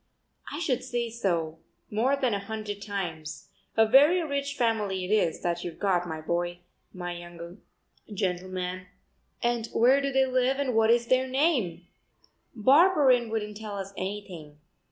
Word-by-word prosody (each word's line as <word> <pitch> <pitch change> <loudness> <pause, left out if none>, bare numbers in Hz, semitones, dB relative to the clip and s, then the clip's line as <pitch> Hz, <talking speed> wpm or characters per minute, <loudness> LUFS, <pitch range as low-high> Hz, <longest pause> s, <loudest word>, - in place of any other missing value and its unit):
"I 290 - -4
should 275 -8 -1
say 240 -2 -2
so 170 -8 -1 0.3
more 240 +6 +2
than 260 -5 0
a 200 - 0
hundred 205 0 -6
times. 175 -7 -5 0.3
A 225 - +6
very 290 +10 +5
rich 280 -2 -2
family 210 -6 0
it 185 - -5
is, 210 -6 +2
that 175 0 -1
you've 170 -2 -6
got, 180 -3 +1
my 160 -2 -5
boy, 175 +2 -2 0.3
my 175 -1 -5
young 175 +2 -10 0.5
gentleman." 185 -2 -3 0.6
"And 235 -1 0
where 255 +5 +4
do 275 0 -1
they 265 0 +3
live 255 +1 +1
and 275 -3 -1
what 225 0 +3
is 235 0 +4
their 255 +2 +2
name?" 255 - 0 0.7
"Barberin 265 - +5
wouldn't 210 -2 -3
tell 210 -2 -6
us 195 0 -6
anything. 185 -6 -6
215 Hz, 155 wpm, -27 LUFS, 180-255 Hz, 0.7 s, A